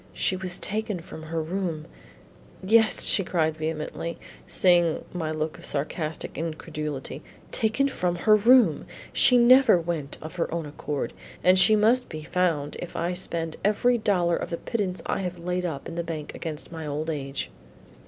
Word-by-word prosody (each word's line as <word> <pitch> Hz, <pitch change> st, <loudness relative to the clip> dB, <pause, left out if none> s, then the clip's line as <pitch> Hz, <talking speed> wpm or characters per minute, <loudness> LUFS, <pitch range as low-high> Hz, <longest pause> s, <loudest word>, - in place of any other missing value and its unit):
She 190 Hz, -, 0 dB
was 185 Hz, -1 st, -3 dB
taken 210 Hz, -2 st, -2 dB
from 165 Hz, -1 st, -10 dB
her 160 Hz, +1 st, -4 dB
room 165 Hz, -1 st, -3 dB, 0.4 s
" -, -, -25 dB
"Yes," 220 Hz, +3 st, +5 dB
she 195 Hz, -, +3 dB
cried 160 Hz, -3 st, 0 dB
vehemently, 160 Hz, +1 st, -4 dB, 0.3 s
seeing 175 Hz, -3 st, +3 dB
my 165 Hz, -3 st, -3 dB
look 155 Hz, 0 st, -3 dB
of -, -, -9 dB
sarcastic 155 Hz, +2 st, -3 dB
incredulity, 150 Hz, -4 st, -5 dB, 0.3 s
"taken 230 Hz, +5 st, +1 dB
from 180 Hz, -10 st, -1 dB
her 215 Hz, +5 st, +4 dB
room; 240 Hz, +4 st, +4 dB, 0.3 s
she 250 Hz, -, +5 dB
never 255 Hz, -4 st, +6 dB
went 165 Hz, -4 st, -4 dB
of 160 Hz, +4 st, -9 dB
her 170 Hz, -, -1 dB
own 165 Hz, -1 st, -2 dB
accord; 145 Hz, -1 st, -4 dB, 0.3 s
and 185 Hz, +1 st, +6 dB
she 215 Hz, +3 st, +7 dB
must 230 Hz, +4 st, +3 dB
be 155 Hz, -1 st, -7 dB
found 160 Hz, -4 st, -1 dB
if 175 Hz, -, -7 dB
I 175 Hz, +2 st, -1 dB
spend 165 Hz, -3 st, -3 dB
every 235 Hz, +4 st, +2 dB
dollar 180 Hz, -5 st, +2 dB
of -, -, -5 dB
the 170 Hz, -, -3 dB
pittance 185 Hz, -6 st, -2 dB
I -, -, -1 dB
have 180 Hz, -2 st, -4 dB
laid 180 Hz, +1 st, -2 dB
up 150 Hz, -6 st, -4 dB
in 165 Hz, -, -7 dB
the 170 Hz, 0 st, -2 dB
bank 160 Hz, -3 st, -6 dB
against 160 Hz, -2 st, -6 dB
my 160 Hz, -2 st, -6 dB
old 150 Hz, +2 st, -2 dB
age." 140 Hz, -2 st, -4 dB
170 Hz, 175 wpm, -26 LUFS, 155-190 Hz, 0.4 s, she